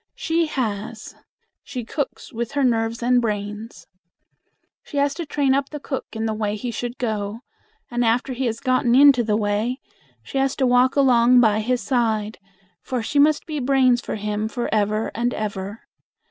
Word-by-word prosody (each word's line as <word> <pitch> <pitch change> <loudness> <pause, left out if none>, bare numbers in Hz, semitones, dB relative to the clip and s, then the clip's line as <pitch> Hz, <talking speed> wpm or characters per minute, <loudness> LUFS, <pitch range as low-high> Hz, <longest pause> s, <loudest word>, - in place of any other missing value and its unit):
She 330 0 0
has. 220 -5 -4 0.5
She 250 -4 -6
cooks 285 +1 -5
with 235 +3 -4
her 285 -1 +1
nerves 230 -1 0
and 245 0 +3
brains. 210 0 -4 1.0
She 290 - -8
has 280 0 +2
to 330 0 -6
train 280 -3 +1
up 275 0 0
the 300 - -6
cook 270 -1 -5
in 220 0 -3
the 220 - -1
way 210 -1 -2
he 240 +3 -4
should 240 +2 -5
go, 215 -3 -3 0.5
and 240 0 0
after 240 +3 +1
he 255 0 -1
has 230 0 -3
gotten 255 -2 +2
into 275 -3 +7
the 210 -1 +1
way, 215 +4 -1 0.4
she 270 - -3
has 270 0 +1
to 265 - +1
walk 250 +1 +3
along 250 -3 +5
by 215 -3 +4
his 245 +3 0
side, 220 -5 0 0.4
for 250 -3 -3
she 290 +5 0
must 300 +1 +4
be 310 -3 -4
brains 255 -2 +3
for - - -4
him 210 0 -2
for 240 +1 -3
ever 215 +1 0
and 240 +2 -1
ever. 205 0 -5
240 Hz, 180 wpm, -22 LUFS, 220-265 Hz, 1.0 s, into